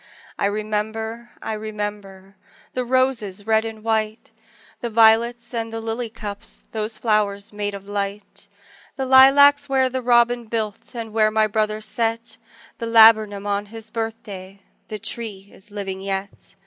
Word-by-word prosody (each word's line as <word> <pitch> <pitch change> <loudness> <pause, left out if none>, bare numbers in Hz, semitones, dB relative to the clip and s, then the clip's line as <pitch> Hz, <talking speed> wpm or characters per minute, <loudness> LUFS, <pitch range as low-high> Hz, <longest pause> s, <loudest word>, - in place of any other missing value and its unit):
I - - +2
remember, 220 +3 -3
I 220 - -3
remember 205 -2 -6 0.4
The 255 - -1
roses 240 -6 0
red 220 0 +2
and 220 -1 -7
white, 220 -1 -1 0.5
The 235 - -3
violets 230 +1 +3
and 225 -1 -3
the 225 - -4
lily 225 +1 -4
cups 210 -2 -8
Those 220 0 -3
flowers 210 -3 0
made 205 -1 -3
of 200 0 -10
light! 205 0 -5 0.5
The 265 - -2
lilacs 280 +2 +7
where 265 -1 +2
the 260 0 -3
robin 240 0 +3
built, 220 0 -4
And 225 -2 -6
where 215 -1 +4
my 215 0 +2
brother 215 0 -1
set 225 +1 -2 0.4
The 230 - -3
laburnum 220 -3 +6
on 205 0 -1
his 225 +1 -10
birthday, 200 -4 -6 0.2
The 215 - -5
tree 210 -2 -5
is 195 - -14
living 195 -2 -5
yet! 195 0 -5
220 Hz, 150 wpm, -22 LUFS, 205-230 Hz, 0.5 s, lilacs